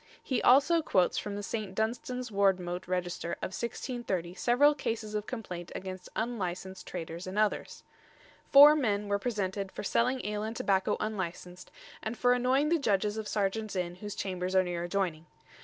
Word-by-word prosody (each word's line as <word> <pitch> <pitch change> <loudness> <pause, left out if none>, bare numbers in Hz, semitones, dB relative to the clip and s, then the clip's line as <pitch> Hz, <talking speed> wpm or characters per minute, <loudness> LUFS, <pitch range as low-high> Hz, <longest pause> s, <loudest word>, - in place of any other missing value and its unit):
He 260 - 0
also 285 +6 +5
quotes 185 - +2
from 205 -1 -5
the 205 - -5
St. 205 -2 -4
Dunstan's 245 +2 -2
Wardmote 190 -3 +1
Register 180 -1 -2
of 185 - -5
1630 235 -6 -3
several 250 +9 +4
cases 225 -6 -3
of 210 0 -3
complaint 180 -8 -6
against 185 -1 -6
unlicensed 190 -5 -3
traders 170 0 -6
and 190 +2 -5
others. 215 -1 0 0.7
Four 290 +2 +10
men 210 -8 0
were 200 0 +1
presented 200 -4 -2
"for - - -6
selling 250 +5 +1
ale 210 0 -2
and 220 +2 -4
tobacco 195 -3 +1
unlicensed, 180 -3 -5 0.3
and 220 +2 -4
for 245 0 +4
annoying 255 +4 +2
the 335 0 +3
Judges 210 -4 +1
of 220 -1 -4
Serjeants 210 +1 -1
Inn 175 -1 -2
whose 205 +1 -6
chambers 185 -1 -3
are 185 - +6
near 175 -1 -3
adjoyning." 175 -4 -1
205 Hz, 165 wpm, -30 LUFS, 185-235 Hz, 0.7 s, Four